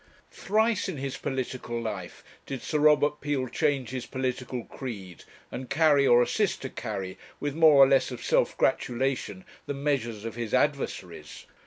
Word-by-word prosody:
Thrice 215 Hz, -1 st, +1 dB
in 175 Hz, -, -4 dB
his 135 Hz, 0 st, -4 dB
political 130 Hz, -3 st, -4 dB
life 105 Hz, -6 st, -6 dB, 0.2 s
did 135 Hz, -3 st, -5 dB
Sir 150 Hz, -, -1 dB
Robert 150 Hz, 0 st, +4 dB
Peel 145 Hz, -3 st, -1 dB
change 135 Hz, -3 st, 0 dB
his 130 Hz, -2 st, -5 dB
political 125 Hz, -1 st, -3 dB
creed, 100 Hz, -, -8 dB, 0.3 s
and 130 Hz, 0 st, -6 dB
carry, 150 Hz, -4 st, +4 dB
or 120 Hz, 0 st, +6 dB
assist 205 Hz, -, 0 dB
to 130 Hz, -, -4 dB
carry, 100 Hz, -5 st, -5 dB, 0.2 s
with 145 Hz, -1 st, -2 dB
more 160 Hz, -1 st, +6 dB
or -, -, +7 dB
less 135 Hz, -1 st, +3 dB
of 125 Hz, -2 st, -7 dB
self -, -, +2 dB
gratulation, 125 Hz, -6 st, -1 dB, 0.2 s
the 145 Hz, -, -3 dB
measures 125 Hz, -7 st, -2 dB
of 115 Hz, -, -4 dB
his 115 Hz, -2 st, -2 dB
adversaries. -, -, -2 dB
130 Hz, 160 wpm, -27 LUFS, 120-145 Hz, 0.3 s, or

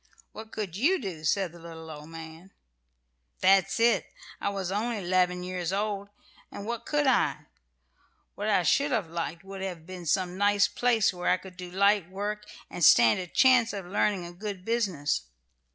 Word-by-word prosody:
'" -, -, -28 dB
"What 220 Hz, 0 st, -10 dB
could 200 Hz, -6 st, -4 dB
you 315 Hz, -, +2 dB
do?" 180 Hz, -9 st, -6 dB
said 190 Hz, +2 st, +1 dB
the 170 Hz, -, -14 dB
little 165 Hz, -1 st, -10 dB
old 150 Hz, 0 st, -10 dB
man. 165 Hz, +3 st, -10 dB, 0.9 s
"That's 195 Hz, +1 st, +4 dB
it. 235 Hz, +1 st, +2 dB, 0.3 s
I -, -, -1 dB
was 195 Hz, -2 st, -3 dB
only 220 Hz, +3 st, -1 dB
'leven 180 Hz, -1 st, +1 dB
years 180 Hz, -1 st, -3 dB
old, 200 Hz, 0 st, -2 dB, 0.4 s
and 200 Hz, -, -7 dB
what 235 Hz, +1 st, -4 dB
could 295 Hz, -1 st, +1 dB
I? 265 Hz, -, +2 dB, 0.9 s
What -, -, -3 dB
I -, -, +3 dB
should 285 Hz, +1 st, +3 dB
have 205 Hz, -, -1 dB
liked 170 Hz, 0 st, -4 dB
would 195 Hz, 0 st, -8 dB
have 180 Hz, -4 st, -5 dB
been 180 Hz, -1 st, -8 dB
some 185 Hz, +3 st, 0 dB
nice 205 Hz, 0 st, +4 dB
place 230 Hz, -4 st, +2 dB
where 175 Hz, -1 st, -2 dB
I -, -, +4 dB
could 185 Hz, 0 st, -13 dB
do 180 Hz, 0 st, -8 dB
light 200 Hz, -1 st, +2 dB
work, 205 Hz, +2 st, -4 dB, 0.2 s
and 175 Hz, -, -5 dB
stand 120 Hz, -1 st, +7 dB
a 180 Hz, -, -5 dB
chance 250 Hz, +2 st, +4 dB
of 195 Hz, -3 st, -5 dB
learning 185 Hz, 0 st, 0 dB
a 175 Hz, -, -9 dB
good 195 Hz, 0 st, -6 dB
business. 190 Hz, -, 0 dB
190 Hz, 185 wpm, -28 LUFS, 175-210 Hz, 0.9 s, stand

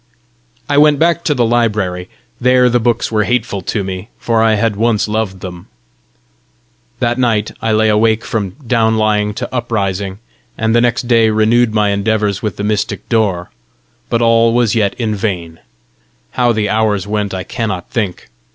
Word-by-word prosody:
I 145 Hz, 0 st, +3 dB
went 150 Hz, -1 st, +5 dB
back 170 Hz, +2 st, +1 dB
to 150 Hz, -, +1 dB
the 120 Hz, -2 st, +2 dB
library. 105 Hz, -6 st, 0 dB, 0.3 s
There 125 Hz, 0 st, +4 dB
the 120 Hz, -, +3 dB
books 115 Hz, 0 st, 0 dB
were 105 Hz, -1 st, +2 dB
hateful 115 Hz, -3 st, -1 dB
to 105 Hz, +2 st, -2 dB
me 95 Hz, +2 st, -6 dB
for 115 Hz, -1 st, 0 dB
I 110 Hz, -1 st, +3 dB
had 110 Hz, 0 st, 0 dB
once 110 Hz, 0 st, +1 dB
loved 105 Hz, -3 st, -2 dB
them. 90 Hz, -2 st, -8 dB, 1.3 s
That 120 Hz, 0 st, -1 dB
night 110 Hz, -4 st, +1 dB
I 115 Hz, -, 0 dB
lay 110 Hz, 0 st, +3 dB
awake 110 Hz, +1 st, +2 dB
from 100 Hz, -4 st, -3 dB
down 115 Hz, -2 st, +2 dB
lying 105 Hz, -1 st, +1 dB
to -, -, -5 dB
uprising, 100 Hz, -5 st, -2 dB, 0.4 s
and 110 Hz, 0 st, 0 dB
the 120 Hz, -, +4 dB
next 120 Hz, 0 st, 0 dB
day 115 Hz, -2 st, +4 dB
renewed 110 Hz, +1 st, +2 dB
my 105 Hz, -1 st, +2 dB
endeavours 100 Hz, 0 st, 0 dB
with 105 Hz, -3 st, -3 dB
the 100 Hz, -, -4 dB
mystic 105 Hz, 0 st, -2 dB
door. 100 Hz, -7 st, 0 dB, 0.6 s
But 115 Hz, 0 st, +1 dB
all 115 Hz, 0 st, +3 dB
was 120 Hz, -3 st, +2 dB
yet 105 Hz, -4 st, +1 dB
in 115 Hz, -3 st, -2 dB
vain. 90 Hz, -6 st, -3 dB, 0.7 s
How 120 Hz, -1 st, +2 dB
the 110 Hz, -2 st, 0 dB
hours 110 Hz, -3 st, 0 dB
went 105 Hz, -2 st, -2 dB
I 95 Hz, -, -4 dB
cannot 100 Hz, -7 st, -4 dB
think. 105 Hz, -6 st, -3 dB
110 Hz, 170 wpm, -15 LUFS, 100-115 Hz, 1.3 s, went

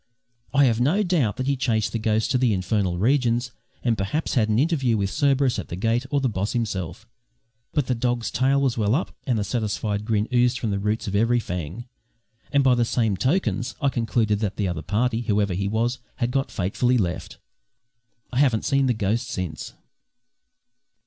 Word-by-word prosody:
I 140 Hz, 0 st, +5 dB
have 120 Hz, -2 st, +2 dB
no 170 Hz, +12 st, +3 dB
doubt 160 Hz, -, +1 dB
that 130 Hz, -, -2 dB
he 140 Hz, +1 st, +1 dB
chased 115 Hz, -5 st, 0 dB
the 115 Hz, -, -2 dB
ghost 110 Hz, 0 st, +1 dB
to 130 Hz, -, +2 dB
the 125 Hz, -4 st, +3 dB
infernal 95 Hz, -1 st, 0 dB
regions 120 Hz, +2 st, +1 dB, 0.3 s
and 120 Hz, -2 st, +2 dB
perhaps 105 Hz, +11 st, -2 dB
had 110 Hz, -5 st, +2 dB
an 105 Hz, -, +2 dB
interview 135 Hz, -5 st, +2 dB
with 100 Hz, -1 st, -1 dB
Cerberus 140 Hz, -3 st, +2 dB
at -, -, -6 dB
the -, -, -5 dB
gate, 115 Hz, +6 st, 0 dB
or 145 Hz, -, +1 dB
the 135 Hz, -, +1 dB
boss 100 Hz, -2 st, -2 dB
himself; 110 Hz, -2 st, -3 dB, 0.6 s
but 150 Hz, -4 st, 0 dB
the 125 Hz, -, 0 dB
dog's 120 Hz, -1 st, -1 dB
tail 135 Hz, +3 st, +2 dB
was 130 Hz, -4 st, 0 dB
well 105 Hz, +2 st, +2 dB
up 165 Hz, -, -2 dB
and 125 Hz, -3 st, +2 dB
a -, -, 0 dB
satisfied 105 Hz, -1 st, -2 dB
grin 110 Hz, -1 st, 0 dB
oozed 125 Hz, 0 st, +3 dB
from 110 Hz, -2 st, -2 dB
the 100 Hz, -, -1 dB
roots 105 Hz, +2 st, -1 dB
of 100 Hz, -, -2 dB
every 115 Hz, +3 st, +3 dB
fang, 90 Hz, +2 st, -5 dB, 0.7 s
and 140 Hz, -1 st, +3 dB
by 130 Hz, -1 st, +5 dB
the 120 Hz, -1 st, +2 dB
same 115 Hz, -3 st, +1 dB
tokens 120 Hz, -, 0 dB
I 140 Hz, -, +2 dB
concluded 115 Hz, -4 st, 0 dB
that 105 Hz, -2 st, -2 dB
the 100 Hz, -, -1 dB
other 85 Hz, -3 st, -3 dB
party, 115 Hz, +7 st, 0 dB
whoever 105 Hz, -4 st, +1 dB
he 100 Hz, +2 st, -1 dB
was, 115 Hz, +5 st, 0 dB, 0.2 s
had 120 Hz, 0 st, -1 dB
got 135 Hz, +1 st, 0 dB
fatally 120 Hz, +7 st, +1 dB
left. 90 Hz, -6 st, -3 dB, 1.0 s
I 125 Hz, -, +1 dB
haven't 130 Hz, -6 st, +2 dB
seen 135 Hz, -1 st, +2 dB
the 125 Hz, -, +1 dB
ghost 110 Hz, +2 st, -1 dB
since. 90 Hz, -5 st, -5 dB
115 Hz, 195 wpm, -24 LUFS, 105-130 Hz, 1.0 s, I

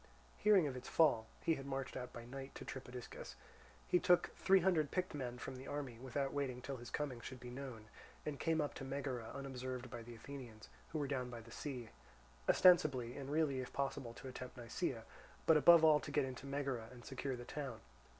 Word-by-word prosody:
Hearing 205 Hz, -5 st, +6 dB
of 135 Hz, -3 st, -2 dB
its 125 Hz, -, -7 dB
fall 135 Hz, -9 st, +4 dB, 0.2 s
(he 165 Hz, -, +4 dB
had 135 Hz, -3 st, -5 dB
marched 135 Hz, -1 st, -3 dB
out 125 Hz, -1 st, -4 dB
by 120 Hz, -2 st, -8 dB
night 135 Hz, +2 st, -7 dB
to -, -, -7 dB
Tripodiscus), 125 Hz, -2 st, -7 dB, 0.5 s
he 180 Hz, -, +4 dB
took 180 Hz, 0 st, +4 dB
three 190 Hz, 0 st, +5 dB
hundred 165 Hz, -5 st, +3 dB
picked 185 Hz, -1 st, -1 dB
men 125 Hz, -4 st, -3 dB
from 130 Hz, +1 st, -6 dB
the 130 Hz, -, -9 dB
army, 135 Hz, -5 st, -4 dB
without 135 Hz, +2 st, -2 dB
waiting 135 Hz, -3 st, -1 dB
till 135 Hz, +1 st, -5 dB
his 120 Hz, -1 st, -8 dB
coming 135 Hz, -5 st, -2 dB
should 130 Hz, +1 st, -7 dB
be 125 Hz, 0 st, -8 dB
known, 125 Hz, -4 st, -6 dB, 0.4 s
and 150 Hz, -2 st, -3 dB
came 160 Hz, -1 st, +2 dB
up 145 Hz, -, -1 dB
to -, -, -7 dB
Megara 135 Hz, -4 st, -3 dB
unobserved 130 Hz, -2 st, -5 dB
by 120 Hz, -, -5 dB
the 120 Hz, +1 st, -9 dB
Athenians, 115 Hz, -2 st, -9 dB, 0.2 s
who 160 Hz, -, -3 dB
were 145 Hz, -2 st, 0 dB
down 130 Hz, -3 st, -1 dB
by 120 Hz, -1 st, -6 dB
the 115 Hz, +1 st, -14 dB
sea, 125 Hz, -5 st, -5 dB, 0.6 s
ostensibly, 135 Hz, -9 st, +6 dB
and 140 Hz, -1 st, -5 dB
really 145 Hz, -3 st, +2 dB
if 125 Hz, -, -4 dB
possible, 135 Hz, -4 st, -2 dB
to -, -, -8 dB
attempt 125 Hz, 0 st, -7 dB
Nisaea, 120 Hz, +1 st, -2 dB, 0.4 s
but 160 Hz, -, +7 dB
above 165 Hz, +2 st, +8 dB
all 155 Hz, -1 st, +7 dB
to -, -, -7 dB
get 145 Hz, -1 st, +2 dB
into 130 Hz, +1 st, -6 dB
Megara 135 Hz, -5 st, -2 dB
and 120 Hz, -1 st, -12 dB
secure 130 Hz, 0 st, -3 dB
the 120 Hz, 0 st, -8 dB
town. 135 Hz, -6 st, -4 dB
135 Hz, 210 wpm, -38 LUFS, 125-145 Hz, 0.6 s, above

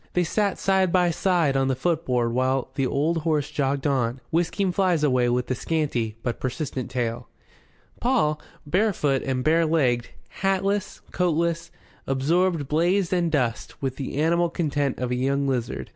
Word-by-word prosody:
They 180 Hz, -, +2 dB
sat 200 Hz, +3 st, 0 dB
side 190 Hz, -2 st, +2 dB
by 180 Hz, -1 st, +3 dB
side 170 Hz, -5 st, +1 dB
on 135 Hz, 0 st, +2 dB
the 130 Hz, -, +1 dB
footboard 125 Hz, -6 st, 0 dB
while 130 Hz, +1 st, 0 dB
the 135 Hz, -1 st, 0 dB
old 155 Hz, +6 st, 0 dB
horse 155 Hz, -2 st, 0 dB
jogged 140 Hz, -2 st, -1 dB
on, 130 Hz, -3 st, 0 dB
whisking 175 Hz, +3 st, +1 dB
flies 180 Hz, -4 st, +1 dB
away 125 Hz, -4 st, +3 dB
with 125 Hz, +1 st, -1 dB
a -, -, +3 dB
scanty 130 Hz, -7 st, -1 dB
but 120 Hz, -2 st, -2 dB
persistent 130 Hz, -1 st, -3 dB
tail. 120 Hz, -2 st, -3 dB, 0.7 s
Paul, 220 Hz, -13 st, +1 dB, 0.2 s
barefoot 150 Hz, -6 st, +1 dB
and 130 Hz, -1 st, -2 dB
barelegged, 155 Hz, -7 st, +2 dB, 0.3 s
hatless, 195 Hz, +1 st, 0 dB
coatless, 170 Hz, -1 st, 0 dB, 0.4 s
absorbed 155 Hz, +3 st, +1 dB
blaze 175 Hz, +5 st, +1 dB
and 175 Hz, -2 st, +1 dB
dust 125 Hz, -6 st, -1 dB
with 130 Hz, -2 st, -3 dB
the 135 Hz, 0 st, -5 dB
animal 170 Hz, +3 st, +2 dB
content 145 Hz, -5 st, -1 dB
of 125 Hz, -1 st, -3 dB
a -, -, +1 dB
young 140 Hz, +2 st, 0 dB
lizard. 125 Hz, -4 st, -2 dB
150 Hz, 155 wpm, -24 LUFS, 130-175 Hz, 0.7 s, by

